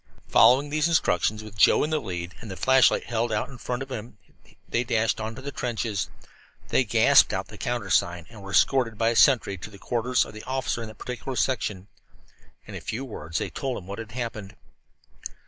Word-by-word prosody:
Following 130 Hz, +7 st, +5 dB
these 155 Hz, +1 st, +2 dB
instructions, 110 Hz, -, +1 dB
with 105 Hz, -2 st, -11 dB
Joe 100 Hz, -, +5 dB
in 150 Hz, -, -2 dB
the 155 Hz, -, +1 dB
lead 90 Hz, -3 st, -5 dB
with 110 Hz, -, -9 dB
the 95 Hz, -, -7 dB
flashlight 130 Hz, +7 st, +4 dB
held 115 Hz, 0 st, -1 dB
out 105 Hz, +3 st, -1 dB
in 130 Hz, -3 st, -11 dB
front 125 Hz, +2 st, -3 dB
of 135 Hz, -, -12 dB
him, 115 Hz, -2 st, -7 dB, 0.5 s
they 120 Hz, -, 0 dB
dashed 115 Hz, -2 st, 0 dB
on 110 Hz, +1 st, -4 dB
to 130 Hz, -, -10 dB
the 140 Hz, -, -5 dB
trenches. 110 Hz, -6 st, -2 dB, 0.6 s
They -, -, +3 dB
gasped -, -, +5 dB
out -, -, -3 dB
the -, -, -11 dB
countersign, 95 Hz, -7 st, 0 dB
and 110 Hz, -3 st, -12 dB
were 95 Hz, -, -9 dB
escorted 115 Hz, +2 st, +2 dB
by 115 Hz, +1 st, +2 dB
a 115 Hz, -, -1 dB
sentry 115 Hz, -8 st, +4 dB
to 95 Hz, -, -8 dB
the 100 Hz, -, -13 dB
quarters 120 Hz, +4 st, 0 dB
of -, -, -11 dB
the 110 Hz, -, -8 dB
officer 130 Hz, -1 st, -2 dB
of 115 Hz, -, -5 dB
that 110 Hz, -, -12 dB
particular 125 Hz, +1 st, -6 dB
section. 105 Hz, -8 st, -1 dB, 0.8 s
In -, -, -10 dB
a -, -, -6 dB
few 125 Hz, +5 st, -4 dB
words 80 Hz, -, -5 dB
they -, -, -3 dB
told 135 Hz, -3 st, -3 dB
him 90 Hz, -, -9 dB
what 100 Hz, +3 st, -7 dB
had 110 Hz, -1 st, -8 dB
happened. 115 Hz, -5 st, -5 dB
115 Hz, 210 wpm, -26 LUFS, 105-130 Hz, 0.8 s, Following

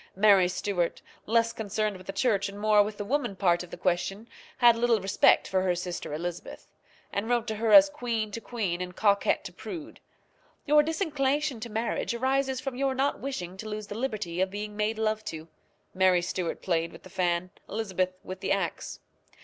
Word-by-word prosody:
Mary 195 Hz, -2 st, +6 dB
Stuart, 180 Hz, -1 st, -1 dB, 0.3 s
less 230 Hz, +1 st, +2 dB
concerned 215 Hz, -1 st, -2 dB
with 185 Hz, 0 st, -12 dB
the -, -, -2 dB
church 200 Hz, -1 st, +1 dB
and 200 Hz, +1 st, -9 dB
more 210 Hz, 0 st, +5 dB
with 205 Hz, 0 st, -2 dB
the 205 Hz, -, -4 dB
woman 270 Hz, -3 st, -1 dB
part 175 Hz, -3 st, +2 dB
of 180 Hz, -, -9 dB
the -, -, -8 dB
question, 195 Hz, +4 st, -1 dB, 0.3 s
had 240 Hz, -2 st, +6 dB
little 230 Hz, -1 st, +2 dB
respect 195 Hz, 0 st, +4 dB
for 190 Hz, -1 st, +1 dB
her 185 Hz, -1 st, +1 dB
sister 175 Hz, -2 st, -5 dB
Elizabeth, 170 Hz, +3 st, -6 dB, 0.4 s
and 205 Hz, +3 st, -2 dB
wrote 240 Hz, -2 st, +2 dB
to 220 Hz, -2 st, -3 dB
her 225 Hz, 0 st, 0 dB
as 295 Hz, +3 st, +10 dB
queen 235 Hz, -7 st, -3 dB
to 230 Hz, -, -5 dB
queen 200 Hz, -9 st, -3 dB
and 180 Hz, 0 st, -5 dB
coquette 200 Hz, -2 st, +2 dB
to -, -, -8 dB
prude: 320 Hz, -4 st, -8 dB, 0.7 s
"Your 300 Hz, +1 st, +6 dB
disinclination 295 Hz, -, 0 dB
to 235 Hz, +2 st, -6 dB
marriage 225 Hz, +2 st, -2 dB
arises 265 Hz, +1 st, 0 dB
from 270 Hz, -1 st, -4 dB
your 270 Hz, 0 st, 0 dB
not 275 Hz, +2 st, 0 dB
wishing 190 Hz, -10 st, -5 dB
to 215 Hz, +2 st, -7 dB
lose 210 Hz, 0 st, -4 dB
the 205 Hz, -, -7 dB
liberty 215 Hz, -8 st, -2 dB
of 190 Hz, -, +2 dB
being 210 Hz, +1 st, -6 dB
made 215 Hz, +1 st, -1 dB
love 215 Hz, 0 st, 0 dB
to." 160 Hz, -4 st, -6 dB, 0.5 s
Mary 185 Hz, -2 st, +3 dB
Stuart 180 Hz, -1 st, -3 dB
played 170 Hz, -2 st, 0 dB
with -, -, -14 dB
the 185 Hz, -, -13 dB
fan, 175 Hz, 0 st, 0 dB, 0.2 s
Elizabeth 185 Hz, -4 st, -2 dB
with 185 Hz, 0 st, -7 dB
the -, -, -2 dB
axe. 195 Hz, -3 st, -2 dB
210 Hz, 195 wpm, -28 LUFS, 185-240 Hz, 0.7 s, as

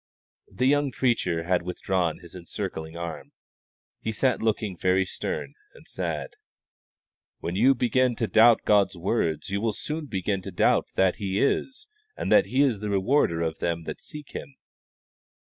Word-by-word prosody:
The 125 Hz, -, -1 dB
young 145 Hz, +1 st, +3 dB
preacher 105 Hz, -10 st, 0 dB
had 90 Hz, +1 st, +1 dB
withdrawn 90 Hz, -1 st, -1 dB
his 85 Hz, -2 st, -12 dB
encircling 85 Hz, -3 st, -6 dB
arm. 85 Hz, -1 st, -6 dB, 0.7 s
He 110 Hz, -, -3 dB
sat 125 Hz, +2 st, +1 dB
looking 110 Hz, -3 st, 0 dB
very 95 Hz, +2 st, +2 dB
stern 75 Hz, -6 st, -4 dB, 0.2 s
and -, -, -17 dB
sad. -, -, -4 dB, 1.0 s
"When 85 Hz, -, -4 dB
you 130 Hz, +7 st, +5 dB
begin 125 Hz, 0 st, +2 dB
to 115 Hz, -, -1 dB
doubt 110 Hz, +1 st, +5 dB
God's 100 Hz, -3 st, +3 dB
word, 85 Hz, -5 st, -1 dB
you 100 Hz, +1 st, -1 dB
will 110 Hz, -1 st, 0 dB
soon 150 Hz, +6 st, -4 dB
doubt 95 Hz, -1 st, +1 dB
that 95 Hz, -1 st, +3 dB
He 100 Hz, 0 st, -2 dB
is, 265 Hz, -, 0 dB, 0.3 s
and -, -, -3 dB
that 255 Hz, -, +6 dB
He 135 Hz, +3 st, +3 dB
is 125 Hz, -8 st, +1 dB
the 105 Hz, 0 st, -4 dB
rewarder 95 Hz, -, +2 dB
of 80 Hz, -1 st, -3 dB
them 85 Hz, -1 st, -1 dB
that -, -, -7 dB
seek 150 Hz, -1 st, -10 dB
Him." 135 Hz, -, -8 dB
100 Hz, 155 wpm, -26 LUFS, 85-125 Hz, 1.0 s, that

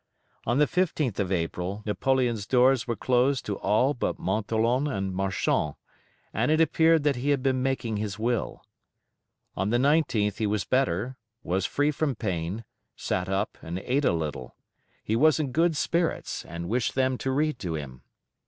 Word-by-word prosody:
On 120 Hz, +3 st, +2 dB
the 150 Hz, -, +5 dB
15th 155 Hz, -, 0 dB
of 95 Hz, -2 st, -1 dB
April 90 Hz, +3 st, -2 dB
Napoleon's 120 Hz, -1 st, 0 dB
doors 130 Hz, -1 st, +4 dB
were 120 Hz, -, -1 dB
closed 130 Hz, +2 st, +1 dB
to 100 Hz, -2 st, -3 dB
all 110 Hz, +8 st, +2 dB
but 125 Hz, -, -2 dB
Montholon 115 Hz, +5 st, 0 dB
and 95 Hz, -8 st, -2 dB
Marchand, 95 Hz, -5 st, 0 dB, 0.6 s
and 115 Hz, +6 st, +1 dB
it 155 Hz, +1 st, +3 dB
appeared 160 Hz, 0 st, +4 dB
that 145 Hz, -3 st, +2 dB
he 135 Hz, +4 st, -1 dB
had 140 Hz, -3 st, +1 dB
been 130 Hz, -2 st, +1 dB
making 130 Hz, -4 st, -1 dB
his 105 Hz, -1 st, -3 dB
Will. 115 Hz, 0 st, -2 dB, 0.9 s
On 95 Hz, +2 st, -1 dB
the 120 Hz, -, +2 dB
19th 130 Hz, -7 st, +2 dB
he 110 Hz, -1 st, 0 dB
was 105 Hz, -1 st, -1 dB
better, 130 Hz, -1 st, 0 dB, 0.3 s
was 95 Hz, +2 st, 0 dB
free 145 Hz, +1 st, +1 dB
from 145 Hz, -2 st, -1 dB
pain, 95 Hz, 0 st, -3 dB, 0.3 s
sat 90 Hz, +1 st, -2 dB
up, 95 Hz, +2 st, -2 dB
and 85 Hz, +2 st, -5 dB
ate 130 Hz, +9 st, 0 dB
a -, -, +4 dB
little. 75 Hz, -6 st, -4 dB, 0.5 s
He 110 Hz, -, 0 dB
was 155 Hz, +6 st, +4 dB
in 145 Hz, -4 st, -1 dB
good 165 Hz, +2 st, +2 dB
spirits, 170 Hz, +2 st, -1 dB
and 85 Hz, 0 st, -6 dB
wished 120 Hz, +3 st, 0 dB
them 130 Hz, -1 st, +2 dB
to 135 Hz, -, -2 dB
read 150 Hz, 0 st, 0 dB
to 90 Hz, -7 st, -3 dB
him. 65 Hz, -4 st, -7 dB
120 Hz, 170 wpm, -27 LUFS, 100-135 Hz, 0.9 s, the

